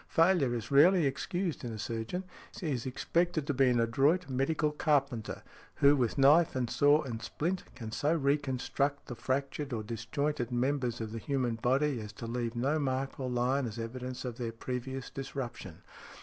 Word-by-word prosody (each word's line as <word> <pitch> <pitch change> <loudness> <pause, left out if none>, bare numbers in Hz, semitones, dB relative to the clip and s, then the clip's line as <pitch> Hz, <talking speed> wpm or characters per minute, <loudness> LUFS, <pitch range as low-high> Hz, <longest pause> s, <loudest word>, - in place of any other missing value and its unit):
"Failure 165 -7 +3
is 115 +3 -5
rarely 165 +4 +6
excused 175 +4 -2
in 120 - -4
a 110 - -5
surgeon. 115 - -3 0.4
He 160 -5 -2
is 130 -1 -2
expected 165 +4 0
to 145 - 0
be 135 0 +4
an 120 -1 +2
adroit 140 +10 +2
medical 140 +3 0
carpenter 140 -6 0 0.3
who, 140 +1 +5
with 125 -3 0
knife 150 +4 +5
and 125 -2 -1
saw 145 +2 +4
and 115 -5 -5
splint, 175 +10 -2
can 115 -4 -7
so 145 +6 0
re 140 -2 +3
construct 140 +1 -2
the 120 - -6
fractured 140 +2 -2
or 110 -2 -2
disjointed 120 +4 -2
members 125 -1 0
of 110 -1 -4
the 115 - -4
human 130 -1 -1
body 130 +4 +1
as 105 0 -8
to 115 - -8
leave 120 0 -3
no 140 +6 +1
mark 135 -1 -2
or 130 -1 -2
line 125 +2 +1
as 110 0 -7
evidence 125 +3 -5
of 120 -2 -5
their 115 -2 -2
previous 130 +3 -5
|78| - - -34
disruption. 120 - -6
130 Hz, 185 wpm, -31 LUFS, 120-145 Hz, 0.4 s, rarely